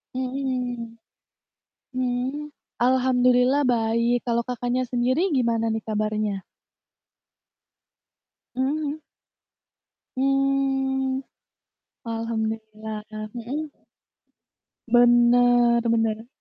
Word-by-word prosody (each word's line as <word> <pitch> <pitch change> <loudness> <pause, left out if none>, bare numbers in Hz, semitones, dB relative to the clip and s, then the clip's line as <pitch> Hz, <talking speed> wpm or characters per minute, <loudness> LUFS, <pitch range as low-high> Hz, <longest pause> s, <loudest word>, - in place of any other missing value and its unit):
Mhm. 250 -3 -3 1.0
Mhm, 255 +4 -2 0.3
alhamdulillah 255 +1 +3
baik, 235 +1 +1
kalau 235 -1 +1
Kakaknya 245 +1 -2
sendiri 255 +10 +1
gimana 230 -5 +1
nih, 220 -1 -2
kabarnya? 215 -2 -1 2.1
Mhm 260 +1 +1
mhm. 305 +1 -2 1.2
Mmm. 270 -1 +1 0.8
Alhamdulillah 220 -1 -4 0.3
mhm? 275 +6 -5 1.2
Bener 240 0 +5
bener. 225 0 0
245 Hz, 60 wpm, -24 LUFS, 230-260 Hz, 2.1 s, Bener